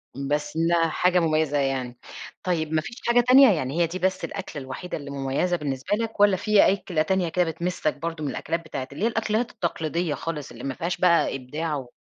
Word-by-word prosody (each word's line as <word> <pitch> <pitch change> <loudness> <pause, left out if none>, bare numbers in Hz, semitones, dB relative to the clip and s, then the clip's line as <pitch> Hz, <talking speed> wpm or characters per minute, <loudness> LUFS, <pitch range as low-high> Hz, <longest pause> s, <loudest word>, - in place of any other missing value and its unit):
بس 145 +3 -2
إنها 165 0 +2
حاجة 180 +3 +2
مميزة 155 -3 +1
يعني، 130 -3 -1 0.5
طيب 160 -4 -1
ما 155 - +2
فيش 235 - -8
حاجة 240 0 +5
تانية 260 -1 +8
يعني 155 +1 -1
هي 170 - +3
دي 180 +3 -5
بس 185 0 0
الأكلة 185 -7 -6
الوحيدة 135 +7 -6
اللي 145 -2 -8
مميزة 140 +6 0
بالنسبة 140 +4 -2
لك؟ 225 0 -4
والّا 205 -2 +5
في 210 +2 +4
أكلة 180 -5 -2
تانية 180 +1 +1
كده 180 +2 +1
بتمِسَّك 170 -1 -2
برضه 165 -1 -4
من 145 - -1
الأكلات 165 +4 -2
بتاعة 135 -4 -5
اللي 145 +9 -5
هي - - +4
الأكلات 225 +1 -1
التقليدية 165 -1 -2
خالص 150 -4 -5
اللي - - -10
ما 135 - -2
فيهاش 170 +5 -3
بقى 170 -5 +3
إبداع 150 +5 -3
و 135 -3 -5
165 Hz, 205 wpm, -25 LUFS, 145-185 Hz, 0.5 s, تانية